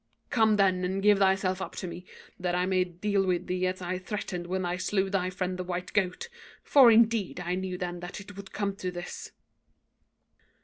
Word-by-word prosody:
Come, 220 -2 +4
then, 190 -2 +3
and 190 +2 -1
give 205 -1 +5
thyself 190 -1 +2
up - - -5
to - - -5
me, 180 +1 -8 0.3
that 180 -1 -1
I 180 0 +1
may 185 -1 +2
deal 195 +3 0
with 180 -2 0
thee 180 0 0
as 185 0 -3
I 180 +1 -2
threatened 185 -2 -4
when 185 0 -1
I 175 +1 -1
slew 195 0 0
thy 185 -2 0
friend 185 0 -3
the - - -1
white 180 0 -4
goat; 195 - 0 0.4
for, 270 -4 +7
indeed, 225 -4 +3
I 180 0 -2
knew 185 0 -3
then 175 -1 -4
that 175 +3 -7
it 205 0 -11
would 195 0 -10
come 200 -1 -2
to 185 - -3
this.' 175 0 -7
185 Hz, 205 wpm, -28 LUFS, 180-200 Hz, 0.4 s, for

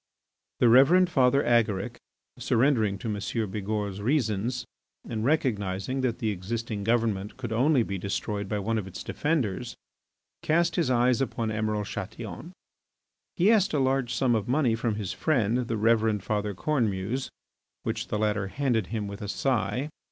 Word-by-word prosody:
The 120 - +5
Reverend 165 +10 +6
Father 135 -2 +4
Agaric, 110 -5 +1 0.4
surrendering 115 -6 +2
to 115 - -6
M. 105 -2 -2 0.3
Bigourd's 105 -1 -3
reasons 120 -1 0 0.4
and 110 -1 -3
recognising 125 -4 0
that 125 -3 0
the 110 -2 -1
existing 105 +2 -4
government 110 -3 0
could 120 -4 -4
only 130 +2 +3
be 100 -3 -4
destroyed 100 +1 -3
by 105 - -1
one 110 +3 -1
of 95 - -6
its 90 -2 -8
defenders, 125 - -1 0.7
cast 170 +2 +2
his 165 -7 +1
eyes 125 +1 +3
upon 115 -4 -1
Emiral 105 -1 -1
Chatillon. 105 - -7 0.8
He 190 +5 +4
asked 205 -6 +3
a - - +2
large 130 -2 +1
sum 125 0 +2
of 110 -1 0
money 130 -2 +2
from 115 -1 -1
his 105 -4 -3
friend, 125 -5 +1
the 115 - -1
Reverend 110 -2 +2
Father 105 -1 -2
Cornemuse, 115 -1 -1 0.5
which - - -3
the 105 - -2
latter 105 -2 0
handed 120 -3 0
him 110 -2 -3
with 100 +2 -7
a 105 - -4
sigh. 125 +3 0
115 Hz, 155 wpm, -27 LUFS, 105-130 Hz, 0.8 s, Reverend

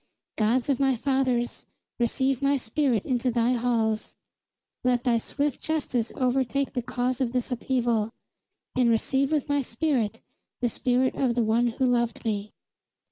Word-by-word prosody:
"Gods 230 +3 +1
of 275 -3 +1
my 270 -1 +3
fathers, 255 -1 0 0.3
receive 260 +2 +1
my 280 0 +3
spirit 250 -2 0
into 250 -1 0
thy 235 0 +2
halls. 230 -3 0 0.7
Let 250 -1 +2
thy 235 -3 +2
swift 285 +4 -2
justice 270 -7 -1
overtake 265 +2 0
the 250 - -1
cause 250 +2 -2
of 245 -2 0
this 250 0 -1
upheaval; 235 -3 0 0.7
and 250 -2 +3
receive 265 +5 +1
with 305 -2 0
my 285 -1 +1
spirit 235 -4 -1 0.4
the 245 - +1
spirit 255 +2 +1
of 250 -4 0
the 240 - +2
one 225 +2 +2
who 240 +3 0
loved 235 -2 0
me." 210 -2 -1
245 Hz, 150 wpm, -26 LUFS, 235-265 Hz, 0.7 s, my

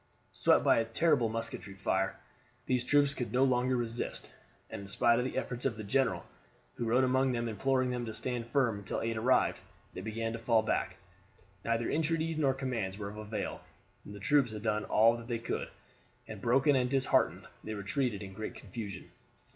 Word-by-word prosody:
Swept - - +3
by - - +5
a - - +2
terrible 125 0 +2
musketry 115 -3 -5
fire, 95 0 -1 0.5
these 125 -1 +1
troops 145 +1 +3
could 125 -3 -4
no 125 +2 +3
longer 130 -1 +2
resist, 120 0 -2 0.4
and - - -5
in 100 - -9
spite 115 +4 +3
of 125 - 0
the 130 - -3
efforts 125 -2 -3
of 130 -5 0
their 110 - -6
general, 135 +6 +1 0.5
who 120 - -4
rode 120 +3 +3
among 130 +1 +2
them 120 -1 -1
imploring 130 +3 +1
them 125 -1 -2
to - - -3
stand 120 +1 -1
firm 120 -5 +1
until 100 - -3
aid 115 0 -1
arrived, 120 +4 +2 0.3
they - - -6
began 115 +1 -3
to 115 - -5
fall 115 -1 +3
back. 95 -4 -1 0.7
Neither 115 0 0
entreaties 160 0 0
nor 135 -3 +2
commands 115 -8 -3
were 100 -1 -5
of 105 - -10
avail; 110 0 -4 0.4
the 105 0 -9
troops 130 +2 +2
had 105 -1 -6
done 105 -1 0
all 115 +2 +4
that 115 0 -10
they 120 -2 -1
could, 115 - -3 0.6
and 110 -3 -8
broken 135 +5 +4
and 125 -1 +2
disheartened 135 0 +2 0.2
they 110 - -5
retreated 105 +1 -1
in 95 -1 -8
great 110 +2 -6
confusion. 100 -2 -7
115 Hz, 190 wpm, -32 LUFS, 110-130 Hz, 0.7 s, by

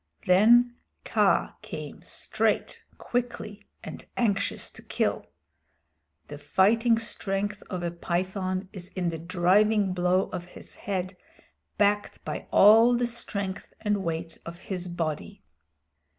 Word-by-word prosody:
Then 240 +6 +5 0.3
Kaa - - +2
came - - -8
straight, - - -1 0.2
quickly, 235 -4 -4 0.2
and - - -8
anxious 210 -5 0
to - - -12
kill. - - -1 1.0
The 145 - -8
fighting 225 +8 +3
strength 205 -2 -3
of 180 -2 -4
a 170 - -1
python 185 +2 -2
is 185 -2 -7
in 180 -2 -1
the 165 -1 -5
driving 190 +4 +3
blow 180 +1 +2
of 175 - -5
his 180 - -12
head 185 -1 -4 0.6
backed 205 0 +1
by - - -5
all 225 +4 +7
the 245 - +1
strength 200 -5 -4
and 210 -2 0
weight 165 -1 -4
of 170 0 -8
his 180 0 -5
body. 155 - -4
195 Hz, 120 wpm, -27 LUFS, 180-215 Hz, 1.0 s, all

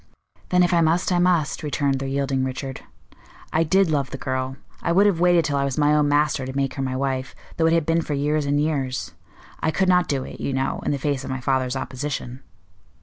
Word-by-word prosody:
"Then, 180 0 +4
if 175 - +2
I 170 - +4
must, 165 +3 +2
I 175 - +3
must," 175 -4 +1
returned 140 -2 0
the 135 - -3
yielding 135 -1 0
Richard. 130 +1 -4 0.7
"I 160 - +3
did 190 +1 +3
love 140 -3 0
the 135 - -6
girl. 130 0 -3 0.2
I 170 - 0
would 195 +4 +5
have 195 -5 +2
waited 175 -1 +4
till 145 -1 0
I 140 - +1
was 135 -2 -2
my 150 0 +3
own 150 -1 +3
master 145 -2 +2
to 130 - -6
make 135 -1 0
her 135 - -4
my 130 -1 -2
wife, 130 -1 -2 0.2
though 160 - +3
it 165 - +3
had 165 -2 +2
been 165 +1 +2
for 150 - -3
years 145 +1 0
and 145 +1 +2
years. 140 -4 -2 0.5
I - - 0
could 190 +4 +1
not 180 -1 +4
do 135 -2 -1
it, - - -9
you 140 - -2
know, 130 0 -1
in - - 0
the 145 - 0
face 140 0 -2
of - - -7
my 130 0 -3
father's 130 0 0
opposition." 130 -1 -4
145 Hz, 240 wpm, -23 LUFS, 135-160 Hz, 0.7 s, would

